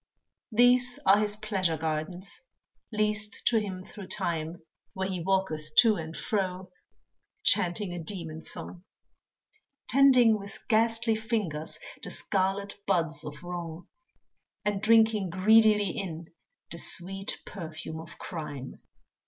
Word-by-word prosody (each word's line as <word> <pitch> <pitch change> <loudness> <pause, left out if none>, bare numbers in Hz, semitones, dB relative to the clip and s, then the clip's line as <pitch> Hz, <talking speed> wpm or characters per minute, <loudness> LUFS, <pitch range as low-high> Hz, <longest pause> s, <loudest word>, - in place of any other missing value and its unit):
These 245 +2 +4
are 195 +2 +6
his 210 -1 0
pleasure 195 -6 -1
gardens, 160 +5 -4 0.5
leased 215 -1 -1
to 230 - +4
him 190 -3 -5
through 200 -3 -10
time 170 -3 -3 0.3
Where 190 0 -2
he 185 -2 -3
walketh 165 -5 -1
to 225 -3 +7
and 160 0 -6
fro, 185 -3 -2 0.7
chanting 180 +1 +3
a 175 - -5
demon 160 -3 -5
song; 175 +2 -1 1.0
Tending 250 -5 +5
with 200 0 -9
ghastly 225 +1 +2
fingers, 215 -9 -2 0.2
the - - -7
scarlet 195 +1 -1
buds 165 -5 +1
of 150 +1 -8
wrong, 175 -1 -6 0.8
And 205 -1 0
drinking 220 -3 +4
greedily 210 +1 +4
in 170 -4 -5 0.5
the 170 - -7
sweet 195 +4 -1
perfume 160 -3 -7
of 165 0 -11
crime. 145 -6 -7
190 Hz, 120 wpm, -28 LUFS, 165-215 Hz, 1.0 s, to